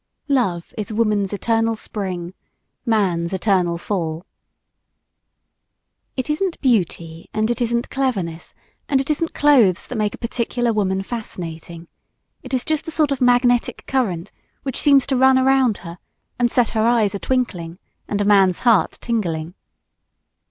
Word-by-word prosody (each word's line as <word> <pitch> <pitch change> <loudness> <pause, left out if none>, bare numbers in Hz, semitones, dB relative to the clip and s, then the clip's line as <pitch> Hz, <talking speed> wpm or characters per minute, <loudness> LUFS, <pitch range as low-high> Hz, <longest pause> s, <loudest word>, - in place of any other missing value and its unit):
Love 195 -11 0
is 215 - -4
woman's 210 -3 +1
eternal 225 +2 0
spring, 185 -5 -5 0.5
man's 185 -6 +1
eternal 185 -3 +1
fall. 170 -2 -3 1.9
It 260 - -2
isn't 330 +4 -1
beauty, 170 - -1
and 215 +2 +1
it 240 - -3
isn't 235 0 -1
cleverness, 195 -12 -2 0.3
and 275 - +3
it 275 +3 -1
isn't 330 +2 -2
clothes 250 -11 +4
that 250 - -5
make 210 -1 0
a - - -16
particular 235 0 -1
woman 195 -2 0
fascinating. 170 -7 -7 0.5
It 255 - -11
is 255 -2 -1
just 310 0 -1
a - - -3
sort 305 -3 +2
of 275 -1 -2
magnetic 245 -1 +2
current 205 -9 -1 0.3
which 270 -3 -2
seems 280 -2 +5
to 275 - 0
run 260 +1 +5
around 260 -4 +3
her 170 +1 -8 0.4
and 240 -1 +3
set 240 -2 +2
her 220 0 +1
eyes 225 -4 +2
a 200 - -3
twinkling 180 -11 -2 0.3
and 205 - -2
a 205 - +1
man's 195 -3 +4
heart 230 -5 +3
tingling. 175 -8 -2
220 Hz, 145 wpm, -21 LUFS, 185-255 Hz, 1.9 s, seems